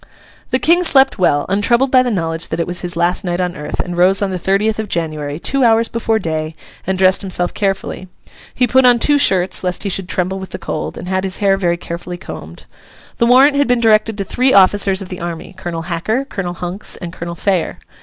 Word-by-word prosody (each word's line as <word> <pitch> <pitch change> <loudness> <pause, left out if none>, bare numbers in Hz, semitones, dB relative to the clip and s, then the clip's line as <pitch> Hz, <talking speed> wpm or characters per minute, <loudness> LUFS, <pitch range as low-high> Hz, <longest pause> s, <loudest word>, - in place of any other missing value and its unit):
The 255 - +1
King 340 +6 +3
slept 270 - +4
well, 145 -5 +2
untroubled 235 +7 +1
by 255 - +6
the 250 - -1
knowledge 165 -6 -2
that - - -4
it 170 - 0
was 175 0 -4
his 175 -1 -5
last 175 +1 +1
night 175 -1 -2
on 180 -1 -2
earth, 150 - -6
and 175 -1 -3
rose 185 +2 +4
on 195 - -1
the 185 - -3
thirtieth 210 +5 0
of 220 - -3
January, 155 -4 -3
two 275 +8 0
hours 230 -1 +3
before 225 -1 0
day, 160 -4 -3 0.3
and 190 0 0
dressed 185 0 +3
himself 180 -2 -2
carefully. 195 -2 -3 0.5
He 250 - +2
put 260 +2 +3
on 245 -1 +6
two 290 +4 +3
shirts 190 -10 +2
lest 180 -1 -2
he 200 - -2
should 190 -1 -2
tremble 185 +1 -1
with 190 - -8
the - - -6
cold, - - -5
and - - -8
had 190 0 -1
his 190 -1 -2
hair 195 -1 +2
very 175 -3 0
carefully 175 +1 -7
combed. 80 - -10 0.5
The 235 - +2
warrant 270 +4 +5
had 285 - +2
been 245 -1 +2
directed 220 -1 +2
to 200 - -2
three 255 +7 +1
officers 195 0 +4
of 185 - -12
the 180 - -7
army, 170 +1 -6
Colonel 175 -3 -5
Hacker, 185 +10 -2
Colonel 180 -9 -5
Hunks, 180 +3 -4
and 170 -2 -8
Colonel 170 0 -6
Phayer. 185 -1 -1
190 Hz, 225 wpm, -16 LUFS, 175-225 Hz, 0.5 s, by